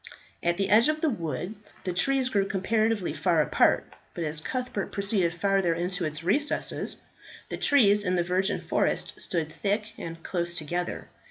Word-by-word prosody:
At 175 0 +1
the 195 -1 0
edge 225 +7 +6
of 305 0 -1
the 315 - +2
wood 170 - -3 0.3
the 180 - -2
trees 265 +7 +2
grew 200 -5 +1
comparatively 215 0 0
far 175 -4 +2
apart, 150 - +2 0.2
but 170 - -3
as 155 0 -2
Cuthbert 250 +2 -3
proceeded 200 -4 +1
farther 195 -2 +2
into 180 +1 -1
its 155 +1 -4
recesses, 280 - 0 0.5
the - - -4
trees 210 -7 +4
in 180 -2 +1
the 175 - +2
virgin 185 +3 0
forest - - -1
stood 160 -3 -2
thick 210 +5 -2
and 165 0 -7
close 175 -1 -1
together. 175 +2 -3
190 Hz, 165 wpm, -27 LUFS, 170-215 Hz, 0.5 s, edge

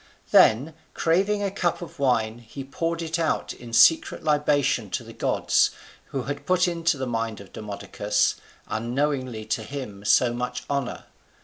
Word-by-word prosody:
Then 135 +9 +5 0.2
craving 195 +5 +1
a 200 - -1
cup 175 -3 -1
of 170 -2 -11
wine, 120 -4 +1
he 120 +4 -9
poured 165 +5 -3
it 165 +1 -2
out 165 - 0
in 120 -1 -11
secret 160 +7 +4
libation 145 -7 +2
to - - -3
the - - -11
gods, - - +2 0.4
who 135 -2 -4
had 145 +2 -5
put 180 0 +3
into 165 -2 0
the 130 - -2
mind 115 -3 -2
of 100 - -13
Demodocus 105 0 -1 0.3
unknowingly 125 -1 -2
to 110 +1 -1
do 110 - -9
him 125 -8 -7
so 120 +4 +4
much 125 +1 -4
honour. 140 -3 -2
135 Hz, 165 wpm, -25 LUFS, 115-165 Hz, 0.4 s, Then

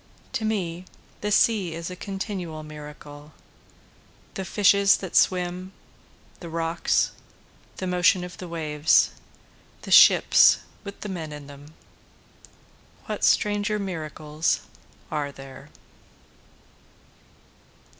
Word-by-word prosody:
To 225 - -2
me 185 -5 -2 0.4
the 210 - -2
sea 200 -6 +2
is 170 +1 -6
a - - -6
continual 190 -5 -5
miracle, 150 0 -11 1.0
The 195 - -4
fishes 200 0 +4
that 190 -3 -8
swim 180 +1 +1 0.7
the 170 - -9
rocks 165 +1 0 0.7
the 185 - -4
motion 180 0 +2
of 180 0 -8
the 180 - -7
waves 155 -2 +2 0.7
the - - -8
ships - - +7 0.2
with 200 -1 -10
the 210 - -5
men 165 -5 -5
in 150 -1 -9
them, 145 +2 -14 1.3
What - - -5
stranger 210 0 +2
miracles 155 -4 -2 0.5
are 145 -2 -2
there? 135 -1 -12
175 Hz, 105 wpm, -25 LUFS, 155-195 Hz, 1.3 s, ships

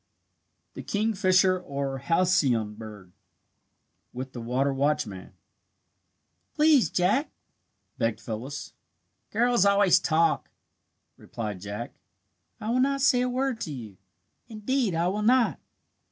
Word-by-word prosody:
THE - - -7
KINGFISHER 190 -3 +2
OR 140 -5 -4
HALCYON 135 - +1
BIRD 105 -4 -11 1.0
WITH 130 +1 -6
THE 120 - -6
WATER 130 +4 0
WATCHMAN 135 -9 -2 1.2
"Please, 300 -4 +4
Jack," 205 - +1 0.7
begged 115 -1 0
Phyllis. 120 +6 -6 0.6
"Girls 240 -1 +2
always 200 -2 +5
talk," 165 +1 +1 0.7
replied 105 -5 -6
Jack. 105 +4 -6 0.7
"I 215 - -3
will 250 - +1
not 275 +1 +1
say 255 -2 +4
a 250 - 0
word 255 -1 -1
to 155 - -4
you 110 -8 -8 0.5
indeed 225 -2 -1
I 170 +2 +1
will 200 +3 -1
not." 245 +2 +3
175 Hz, 110 wpm, -26 LUFS, -, 1.2 s, always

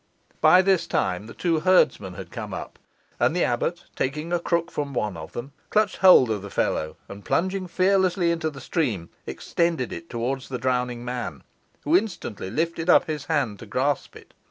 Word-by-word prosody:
By 185 +1 +7
this 190 -2 +2
time 95 +3 -1
the - - -11
two 165 -3 +1
herdsmen 155 - +3
had - - -9
come - - -5
up, - - -8 0.4
and - - +2
the - - +2
abbot, - - -1
taking 150 +6 -2
a 175 - +2
crook 170 0 -1
from 140 -2 -4
one 105 -5 -1
of 80 -1 -9
them, 125 +4 -6 0.2
clutched 215 -2 +2
hold 180 -11 +7
of 105 -3 -1
the 100 - -8
fellow, 80 -4 -1
and, 100 0 -10
plunging 185 +1 0
fearlessly 185 -1 +2
into 165 -1 -1
the 140 -3 -10
stream, 110 - -2 0.2
extended 170 -7 -1
it 170 - -8
towards 125 +3 -3
the 130 - -3
drowning 125 -1 -1
man, 120 - -4 0.4
who 155 +3 +2
instantly 175 - -1
lifted 165 - -2
up - - +6
his 150 -3 -4
hand 140 -11 0
to 115 - -10
grasp 135 +5 -1
it. - - -15
145 Hz, 185 wpm, -25 LUFS, 120-170 Hz, 0.4 s, By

